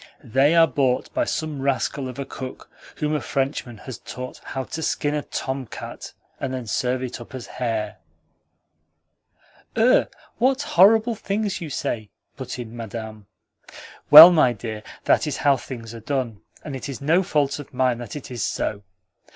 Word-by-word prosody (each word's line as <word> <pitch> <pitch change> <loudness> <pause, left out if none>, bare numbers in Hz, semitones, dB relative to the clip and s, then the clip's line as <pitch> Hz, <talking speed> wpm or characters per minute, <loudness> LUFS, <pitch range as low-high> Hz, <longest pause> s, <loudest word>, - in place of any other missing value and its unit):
They 135 +7 +3
are 165 -1 +7
bought 135 -5 0
by 310 -1 +1
some 155 - -3
rascal 135 0 -1
of 125 - -9
a 140 - -4
cook 130 -1 -8 0.2
whom 150 0 -1
a 150 - 0
Frenchman 135 -4 -2
has 130 -5 -7
taught 125 0 -8
how 135 - -4
to 160 - -6
skin 150 -1 -1
a 150 - -1
tomcat 130 -3 -6 0.3
and 135 - -3
then 130 -2 -4
serve 125 +4 -1
it 125 -1 -5
up 120 - -10
as 125 - -7
hare." 110 -4 -3 1.8
"Ugh! - - +4 0.3
What 260 +3 +2
horrible 220 +6 +5
things 205 -2 -2
you 165 - -5
say!" 110 -6 -3 0.3
put 130 -1 -6
in 120 -2 -7
Madame. 110 -2 -7 0.8
"Well, 155 +4 +13
my 155 -8 +4
dear, 110 -1 -6 0.2
that - - +3
is 145 - -2
how 140 -2 +3
things 120 -3 -8
are 115 - -8
done, 120 -3 -3 0.2
and 145 -3 -6
it 135 - -6
is 135 - -5
no 160 +6 +3
fault 145 -5 0
of 145 - -10
mine 125 -2 +1
that 120 -4 -7
it 145 -3 -8
is 120 -4 -3
so. 105 -1 -2
130 Hz, 170 wpm, -23 LUFS, 120-150 Hz, 1.8 s, Well